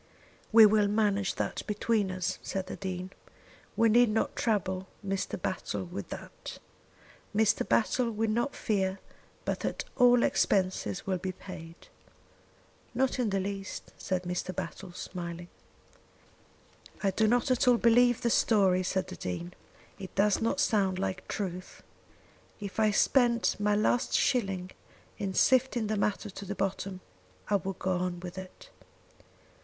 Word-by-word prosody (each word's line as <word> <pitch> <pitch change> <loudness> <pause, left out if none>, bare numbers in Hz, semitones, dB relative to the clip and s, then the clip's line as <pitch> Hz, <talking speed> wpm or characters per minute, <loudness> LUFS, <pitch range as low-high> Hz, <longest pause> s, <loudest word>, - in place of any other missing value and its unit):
"We 225 -1 +9
will 210 -1 +4
manage 205 -2 +1
that - - -2
between 210 -1 +1
us," 185 -1 -2
said 190 -1 -3
the - - -6
Dean. 185 -1 -5 0.7
"We 230 - +5
need 240 +1 +5
not 215 +1 0
trouble 190 -4 -1 0.2
Mr. 195 -2 -2
Battle 165 - -3
with 95 +2 -7
that. - - -8 0.8
Mr. 215 -1 +2
Battle 235 +2 +2
will 220 0 -1
not 240 +5 0
fear 190 -3 0 0.5
but - - -1
that - - -3
all 245 -2 +5
expenses 190 0 +1
will 185 -2 -1
be 185 +1 -3
paid." 165 -3 -10 1.2
"Not 260 +1 +1
in 240 -4 +1
the 195 -1 0
least," 195 0 -5
said 185 -1 -2
Mr. 180 0 -3
Battle, 190 -2 -6
smiling. 175 -1 -6 1.5
"I 195 - +3
do 220 +3 +2
not 245 +3 +2
at 250 0 +2
all 245 -1 +6
believe 240 +1 +4
the 235 - +1
story," 195 -6 +4
said 185 0 -1
the 185 - -7
Dean. 170 - -5 0.5
"It 190 - -9
does 205 +1 +3
not 230 - 0
sound 195 -4 +2
like 190 -1 -3
truth. 185 -2 -5 0.8
If 200 0 -6
I 215 -1 +4
spent 235 +2 +3
my 210 0 +2
last 240 +4 +1
shilling 195 -8 +1 0.5
in 195 -2 -3
sifting 255 -3 +3
the 215 +1 -1
matter 205 0 -1
to 200 - -8
the 200 +2 -4
bottom, 195 -1 -3 0.5
I 200 - +5
would 195 -1 -5
go 190 - -1
on 180 -1 -2
with 180 +1 -7
it. 185 -1 -12
195 Hz, 150 wpm, -30 LUFS, 185-220 Hz, 1.5 s, We